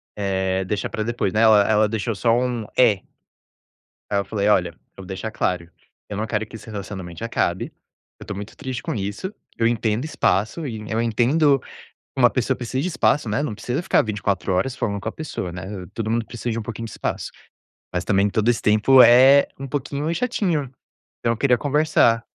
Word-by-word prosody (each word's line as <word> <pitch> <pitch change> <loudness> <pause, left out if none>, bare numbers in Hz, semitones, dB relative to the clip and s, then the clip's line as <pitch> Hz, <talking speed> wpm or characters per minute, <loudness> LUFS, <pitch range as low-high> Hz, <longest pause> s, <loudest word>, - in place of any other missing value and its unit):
eh, 95 -2 -1
deixar 105 +2 -2
pra 110 - -3
depois, 115 -4 -1
né. 110 - +2
Ela 110 -2 +7
ela 110 0 +4
deixou 110 +1 -2
só 115 +3 +2
um 125 -3 -1
"é". 110 -6 +4 1.1
Aí 100 - +1
eu 100 - -2
falei: 105 -2 -1
"Olha, - - +3
eu - - -17 0.2
vou 95 - -9
deixar 95 +4 -5
claro: 90 -6 -2 0.4
eu 105 - -4
não 110 +1 -2
quero 110 0 -1
que 110 - -13
esse 110 - -11
relacionamento 95 -3 -7
acabe, 115 - -1 0.5
eu - - -10
tô 100 - -5
muito 100 +2 -8
triste 130 -3 -5
com - - -2
isso. 105 - -4 0.2
Eu 115 - +3
entendo 115 +2 0
espaço 130 - 0
e 110 -4 -5
eu 115 +1 0
entendo 135 +6 +3
que - - -18 0.5
uma - - +6
pessoa - - 0
precisa 130 +2 -3
de 180 - -1
espaço, 145 -7 +1
né, 105 +4 0
não 115 - -3
precisa 125 +8 -3
ficar 190 - +3
24 100 -3 -1
horas 120 +8 0
falando 100 -2 -2
com 110 - -3
a - - -7
pessoa, 150 - -5
né, 90 +2 -7 0.3
todo 110 -1 -3
mundo 115 0 0
precisa 120 +1 -5
de 115 - -2
um - - -3
pouquinho 115 +1 -6
de 110 - -8
espaço. - - -4 0.6
Mas 90 - -1
também 100 0 +2
todo 110 +3 +1
esse 120 - +1
tempo 110 +5 +6
é 130 +4 +7
um 135 - -5
pouquinho 145 +3 -2
chatinho. 175 - -1 0.5
Então 115 - +1
eu 115 - -7
queria 125 -2 +3
conversar." 140 -5 +2
115 Hz, 205 wpm, -22 LUFS, 105-125 Hz, 1.1 s, Ela